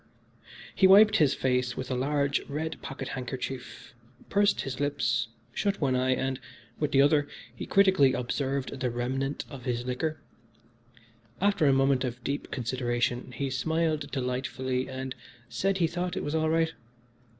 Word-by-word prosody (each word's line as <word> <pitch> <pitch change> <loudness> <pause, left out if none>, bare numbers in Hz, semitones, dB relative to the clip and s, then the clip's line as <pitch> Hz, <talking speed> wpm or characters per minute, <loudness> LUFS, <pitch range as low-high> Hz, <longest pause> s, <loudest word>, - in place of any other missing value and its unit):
X - - -33 0.3
He 190 - +7
wiped 205 +3 +7
his 150 -4 +3
face 125 -1 0
with 130 - -4
a - - +1
large, 140 +2 +1
red 155 +3 -4
pocket 135 - -6
handkerchief, 130 0 -6 0.4
pursed 205 0 +3
his 130 -1 -5
lips, 145 -4 0 0.3
shut 200 -1 0
one 135 -4 +1
eye, 130 0 +2
and, 130 0 -2 0.4
with 150 - 0
the 135 0 +6
other, 145 0 +3 0.3
he - - -6
critically 190 -9 +5
observed 135 +2 -2
the 130 -1 0
remnant 130 +4 -2
of 135 -3 -10
his 120 -1 -1
liquor. 155 +5 -2 1.2
After 200 -5 +3
a - - +6
moment 135 0 +3
of 125 -1 -4
deep 140 +1 -3
consideration 120 0 -1
he 135 +2 -3
smiled 155 +2 0
delightfully 130 -1 -2
and 130 0 -5 0.4
said 195 0 0
he 175 - +3
thought 175 +2 -2
it - - -2
was 145 - -3
all 160 0 +1
right. 160 0 +2
135 Hz, 160 wpm, -28 LUFS, 125-155 Hz, 1.2 s, He